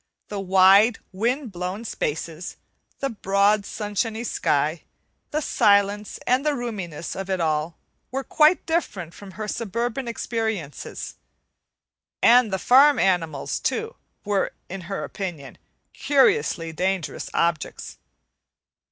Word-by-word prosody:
The 205 - -4
wide, 195 +4 +5
wind 235 +6 -1
blown 185 +5 -5
spaces, 160 -1 -4 0.4
the 275 -1 -1
broad, 200 0 +2
sunshiny 220 +2 -3
sky, - - 0 0.5
the 305 - -1
silence 205 -5 +2
and 255 +2 +2
the 300 -1 +1
roominess 195 - -5
of 195 0 -5
it 190 -1 0
all, 155 0 -1 0.3
were 270 +1 -3
quite 310 +5 +3
different 200 - -2
from 195 -2 -12
her 215 +3 -5
suburban 235 +4 -3
experiences; 220 - -4 1.0
and 240 -2 +5
the 190 - 0
farm 275 +7 +6
animals, 165 -7 0
too, 450 +2 -2 0.3
were 205 -1 0 0.2
in 190 +1 -6
her 195 - -3
opinion 175 -8 -6 0.3
curiously 275 - +2
dangerous 185 0 -2
objects. 170 -2 -1
205 Hz, 115 wpm, -24 LUFS, 185-240 Hz, 1.0 s, farm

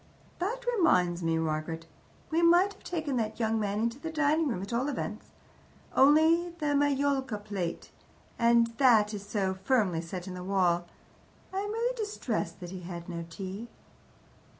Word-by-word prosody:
"That 470 +8 -2
reminds 180 - +3
me, 165 -1 +1
Margaret. 160 +1 -2 0.5
We 325 +2 +2
might 350 +4 +5
have - - -22
taken 315 -6 -2
that 220 -1 -2
young 225 -1 +1
man 205 0 -1
into 235 +3 -1
the 325 - -5
dining 310 +1 +2
room, 205 -8 -2
at 200 - -6
all 255 +5 0
events. 220 -5 -4 0.7
Only 315 +5 +5
the 300 -3 0
majolica 280 -4 +1
plate 200 -5 -5 0.5
and 235 0 +5
that 225 -5 +5
is 200 -1 -5
so 200 -2 -1
firmly 190 -4 +1
set 175 +2 -6
in 185 - -5
the 180 0 -6
wall. 180 -3 +1 0.7
I 380 - -1
am 410 +1 -3
really 470 +3 -1
distressed 425 - -3
that 175 -1 -7
he 190 - -6
had 170 -1 -7
no 170 -1 -5
tea." 195 +6 -6
225 Hz, 165 wpm, -29 LUFS, 185-300 Hz, 0.7 s, might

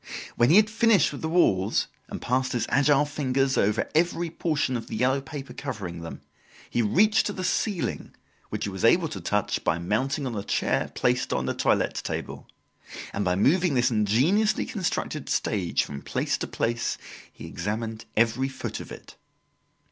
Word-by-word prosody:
When 120 +1 +4
he 165 - +6
had 210 +1 +7
finished 220 -5 +3
with 145 - -7
the 160 - -2
walls, 105 - +2 0.2
and - - -6
passed 130 +1 0
his 120 - 0
agile 145 +1 +4
fingers 135 -2 0
over 105 +2 +1
every 170 +1 +1
portion 155 -6 -1
of 115 - -4
the - - -5
yellow 130 +4 +2
paper 140 0 -8
covering 105 -11 -5
them, 85 - -8 0.5
he 120 - 0
reached 205 - +3
to 205 - -3
the 185 - -5
ceiling, 185 0 -2 0.3
which - - -4
he 100 - -2
was 95 -1 -6
able 165 +8 +4
to 95 - -6
touch 105 +4 -1
by 80 - +1
mounting 130 - -1
on 125 -3 -3
a 100 - -2
chair - - 0
placed 125 +1 +1
on - - 0
the - - -1
toilette - - +1
table, - - -5 0.7
and 100 - -1
by 90 -1 +1
moving 155 - +3
this 125 +1 +3
ingeniously 135 - +2
constructed 185 - -3
stage 95 -6 0
from 70 -1 -7
place - - -1
to - - -3
place 115 0 -1 0.3
he - - -11
examined 110 +4 -4
every 115 +4 +2
foot 135 - -5
of - - -9
it. - - -11
130 Hz, 180 wpm, -26 LUFS, 110-160 Hz, 0.7 s, had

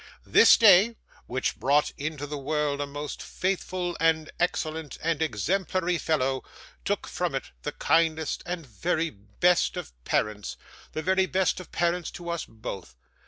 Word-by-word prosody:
This - - +7
day, 215 +1 +7 0.3
which 130 +1 -1
brought 145 +3 +3
into 145 0 -4
the 145 +1 -5
world 145 0 -1
a 145 - -2
most 145 +1 -6
faithful 185 -1 -2
and 160 -1 +2
excellent 160 -3 -1
and 165 -1 0
exemplary 175 - 0
fellow, 135 -4 0 0.4
took - - -1
from - - -2
it - - -4
the - - -4
kindest 160 -2 +1
and 175 -2 -4
very 160 - -1
best 105 - +1
of - - -6
parents, 105 - -1 0.4
the 155 - -3
very 190 +1 +3
best 185 +1 +1
of 185 - -11
parents 170 0 0
to 170 -1 -5
us 170 - -3
both. 110 - -8
160 Hz, 150 wpm, -27 LUFS, 140-175 Hz, 0.4 s, This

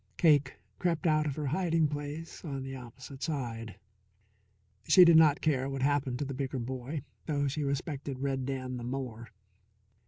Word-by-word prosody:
Cake 145 -5 +4 0.2
crept 175 -1 0
out 155 -1 +3
of 140 - -2
her 150 - -3
hiding 165 +1 +2
place 145 +2 -6
on 140 -5 -4
the 135 0 -6
opposite 130 +2 -10
side. 115 -8 -3 1.1
She 185 -2 +9
did 170 -1 +7
not 155 -3 +6
care 135 -4 +1
what 135 -1 -3
happened 140 -3 +1
to 145 - -2
the 135 - -4
bigger 130 0 -3
boy, 130 +4 -4 0.2
though 145 -2 +1
she 145 +2 -2
respected 140 -1 -3
Red 135 -1 -2
Dan 130 -2 -3
the 120 - -6
more. 120 -3 -5
140 Hz, 165 wpm, -31 LUFS, 130-150 Hz, 1.1 s, She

